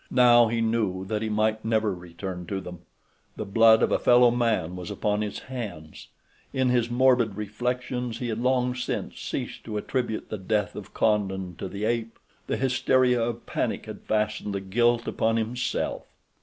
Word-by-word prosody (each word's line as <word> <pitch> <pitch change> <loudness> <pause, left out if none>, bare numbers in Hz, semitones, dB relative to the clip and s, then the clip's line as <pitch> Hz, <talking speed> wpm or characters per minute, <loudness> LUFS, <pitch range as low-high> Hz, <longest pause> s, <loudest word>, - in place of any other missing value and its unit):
Now 120 -2 +6
he 115 +1 -1
knew 110 -5 0
that 105 +2 -2
he 110 - -2
might 110 +1 +1
never 110 -2 +1
return 90 0 -7
to 95 - -2
them. 90 -2 -9 0.6
The 110 - -4
blood 110 +2 +5
of - - +2
a - - +2
fellow 120 0 +6
man 110 -8 0
was 90 -1 -6
upon 105 0 -1
his 105 -1 -3
hands—in 120 +3 -6
his 120 -1 +2
morbid 120 -3 +3
reflections 125 +3 -3
he 120 0 -3
had 110 0 -2
long 125 0 +1
since 125 - -4
ceased - - -4
to 110 -2 -4
attribute 115 0 -2
the 110 - -4
death 105 +1 -1
of 105 -2 -9
Condon 95 -4 0
to - - -4
the 100 +3 -4
ape. 115 0 -1 0.3
The - - -1
hysteria 130 -1 +2
of 115 0 -3
panic - - -2
had - - -8
fastened 105 -1 -1
the - - -1
guilt 120 +5 +1
upon 115 0 +1
himself. 115 +3 -2
110 Hz, 170 wpm, -26 LUFS, 100-120 Hz, 0.6 s, Now